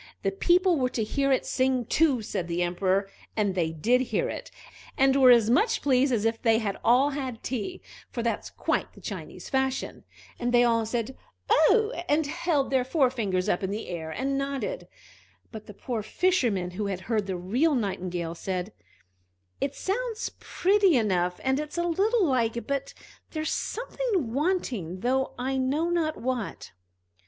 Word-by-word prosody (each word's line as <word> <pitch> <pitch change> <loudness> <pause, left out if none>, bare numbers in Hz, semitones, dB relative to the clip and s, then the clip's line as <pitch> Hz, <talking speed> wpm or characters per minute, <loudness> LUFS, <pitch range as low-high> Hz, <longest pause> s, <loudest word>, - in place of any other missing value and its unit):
The - - +1
people 360 -3 +3
were 255 -1 +1
to 230 - -2
hear 275 +5 0
it 260 - +2
sing 260 -2 +1
too, 280 -4 +2
said 180 -4 -3
the 175 +1 0
Emperor; 185 +3 +1 0.3
and 205 -3 +1
they 170 -3 0
did 235 +11 +2
hear 260 - -1
it, - - -6 0.5
and 270 0 +4
were 265 -2 +7
as 235 -3 +6
much 435 - +2
pleased 270 -1 +3
as 225 -3 +1
if 225 0 0
they 225 -2 +4
had 210 -3 -2
all 260 +5 +4
had 260 -5 -5
tea, 265 - -4 0.3
for 235 - -4
that's 235 - -2
quite - - -2
the - - -15
Chinese - - -7
fashion; 265 -1 -1 0.4
and 240 0 -1
they 245 0 +5
all 230 -2 +2
said 235 +2 -2 0.4
"Oh!" 425 +8 +5 0.2
and 300 +1 +3
held 285 -1 0
their 260 -2 +3
forefingers 245 - +1
up 175 - +1
in 190 - -2
the 210 +3 -4
air 165 -3 -5
and 275 +10 -1
nodded. 280 - -3 0.6
But 220 -2 -9
the 210 - -9
poor 235 -1 -3
Fisherman, 215 - +1
who 205 +3 -3
had 190 -2 -3
heard 210 0 -1
the 190 -2 -2
real 250 - +1
Nightingale, 180 -6 -2
said: 185 +3 -4 0.9
"It 280 0 -2
sounds 455 +3 -2
pretty 390 -4 +3
enough, 180 -5 0
and 265 +1 +1
it's 300 +2 -5
a 345 - +1
little 395 +5 +2
like, 235 -5 0
but 275 0 -3 0.3
there's 310 -1 -3
something 435 - -2
wanting, 250 - -1
though 265 +3 0
I 265 +2 -1
know 290 +6 0
not 320 -3 0
what!" 250 -4 -3
255 Hz, 170 wpm, -27 LUFS, 210-295 Hz, 0.9 s, were